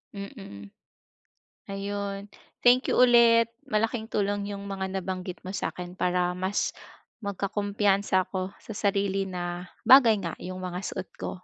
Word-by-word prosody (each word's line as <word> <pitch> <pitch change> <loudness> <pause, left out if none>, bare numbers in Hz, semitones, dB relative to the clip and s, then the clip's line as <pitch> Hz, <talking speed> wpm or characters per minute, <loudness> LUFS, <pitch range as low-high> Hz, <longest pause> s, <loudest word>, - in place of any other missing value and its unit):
Mm. 195 - -9 1.0
Ayun. 200 0 -4 0.4
Thank 250 +2 +5
you - - +1
ulit. 235 -2 +6 0.2
Malaking 225 -1 0
tulong 205 -1 -1
yung 200 0 -6
mga 190 -1 -3
nabanggit 185 -1 -5
mo 185 - -5
sa'kin 180 -2 -4
para 180 -1 +1
mas, 185 +2 -1 0.5
magkakumpiyansa 200 -1 +1
ako 185 0 -3
sa - - -13
sarili 195 -1 +1
na 175 -1 -4 0.2
bagay 250 -5 +8
nga, 170 -2 -3
yung 185 0 -6
mga 180 -1 -4
suot 185 - -5
ko. - - -3
200 Hz, 130 wpm, -27 LUFS, 185-205 Hz, 1.0 s, bagay